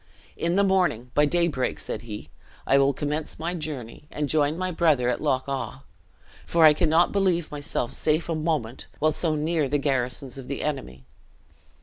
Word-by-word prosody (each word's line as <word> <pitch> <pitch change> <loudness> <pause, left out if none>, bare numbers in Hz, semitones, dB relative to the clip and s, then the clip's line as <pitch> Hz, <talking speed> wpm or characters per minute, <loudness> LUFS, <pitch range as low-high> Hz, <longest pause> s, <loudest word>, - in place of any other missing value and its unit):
"In 170 +1 0
the 200 - +4
morning, 180 - +1
by 150 - +4
daybreak," 165 -4 +1
said - - -5
he, 105 -9 -8 0.4
"I 135 - +4
will 140 0 +4
commence 150 +3 -3
my 165 +2 -3
journey, 150 -6 -6
and 150 -1 -2
join 150 +1 +1
my 185 0 -2
brother 155 -8 +2
at 125 - -1
Loch 135 -3 0
awe; 135 0 -4 0.6
for 165 -1 +5
I 155 - +8
cannot 160 +2 +3
believe 185 -5 +1
myself 145 -4 -2
safe 155 +2 +1
a 170 - -1
moment, 155 -7 -2
while 155 +1 +2
so 155 0 0
near 155 -1 0
the 145 - +2
garrisons 135 -1 -2
of 130 - -9
the 140 - -4
enemy." 130 - -4
150 Hz, 180 wpm, -25 LUFS, 135-165 Hz, 0.6 s, I